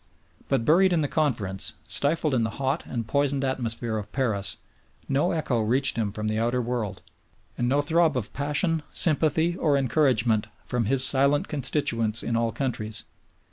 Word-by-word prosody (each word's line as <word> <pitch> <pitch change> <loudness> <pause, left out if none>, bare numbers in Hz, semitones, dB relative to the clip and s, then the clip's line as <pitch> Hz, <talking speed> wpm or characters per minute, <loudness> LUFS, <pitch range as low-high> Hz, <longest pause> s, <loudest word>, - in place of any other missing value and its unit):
But 135 -5 0
buried 180 +4 +4
in 165 - +2
the - - 0
Conference, 115 - -2
stifled 150 0 +1
in 125 - +2
the 115 - -1
hot 140 +3 -2
and 115 -3 -4
poisoned 140 +2 0
atmosphere 120 -4 -2
of 105 - -9
Paris, 105 -8 0 0.5
no 140 +5 +1
echo 140 -8 -1
reached 130 +6 +2
him 110 -3 -1
from 105 +1 -4
the 110 0 -1
outer 120 +2 0
world, 115 -5 -3 0.5
and 120 0 -1
no 140 +2 +2
throb 160 -1 +2
of 115 -4 -4
passion, 150 +4 0
sympathy, 160 +1 +1
or 150 -5 +1
encouragement 125 -6 +2 0.2
from 120 -2 -1
his 130 +3 +6
silent 140 +2 +4
constituents 120 -6 0
in 115 - -2
all 115 0 0
countries. 110 -5 -4
130 Hz, 165 wpm, -25 LUFS, 115-145 Hz, 0.5 s, his